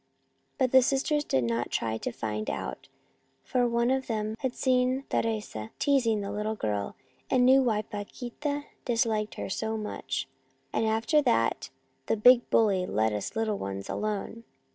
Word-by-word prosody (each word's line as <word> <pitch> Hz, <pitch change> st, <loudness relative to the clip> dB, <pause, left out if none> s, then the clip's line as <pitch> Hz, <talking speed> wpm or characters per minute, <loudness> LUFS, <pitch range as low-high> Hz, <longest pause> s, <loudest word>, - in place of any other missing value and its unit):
But 260 Hz, -3 st, +2 dB
the 260 Hz, -, +8 dB
sisters 275 Hz, +3 st, +1 dB
did 130 Hz, -, +1 dB
not 115 Hz, +1 st, -1 dB
try 110 Hz, -1 st, -1 dB
to -, -, -3 dB
find 110 Hz, -2 st, -3 dB
out, -, -, -5 dB, 0.6 s
for 250 Hz, -1 st, +1 dB
one 235 Hz, +1 st, +1 dB
of 265 Hz, 0 st, 0 dB
them 215 Hz, -1 st, -2 dB
had 260 Hz, -2 st, -2 dB
seen 255 Hz, +1 st, +2 dB
Teresa 210 Hz, -, -2 dB
teasing 240 Hz, -7 st, +2 dB
the 200 Hz, 0 st, -4 dB
little 210 Hz, +1 st, -2 dB
girl, 105 Hz, -, -2 dB, 0.3 s
and 250 Hz, -1 st, +4 dB
knew 265 Hz, +1 st, +7 dB
why 220 Hz, -4 st, +1 dB
Paquita 245 Hz, +8 st, -5 dB, 0.2 s
disliked 225 Hz, -3 st, 0 dB
her -, -, -4 dB
so 220 Hz, +3 st, -2 dB
much; 135 Hz, -11 st, -4 dB, 0.5 s
and 225 Hz, -, +1 dB
after 225 Hz, +8 st, +2 dB
that 235 Hz, -, +1 dB, 0.4 s
the -, -, +1 dB
big 245 Hz, +3 st, +6 dB
bully 195 Hz, -5 st, +3 dB
let 110 Hz, +1 st, +1 dB
us 105 Hz, -, -4 dB
little 220 Hz, -2 st, 0 dB
ones 95 Hz, 0 st, -5 dB
alone." 215 Hz, +2 st, -3 dB
220 Hz, 160 wpm, -28 LUFS, 195-250 Hz, 0.6 s, the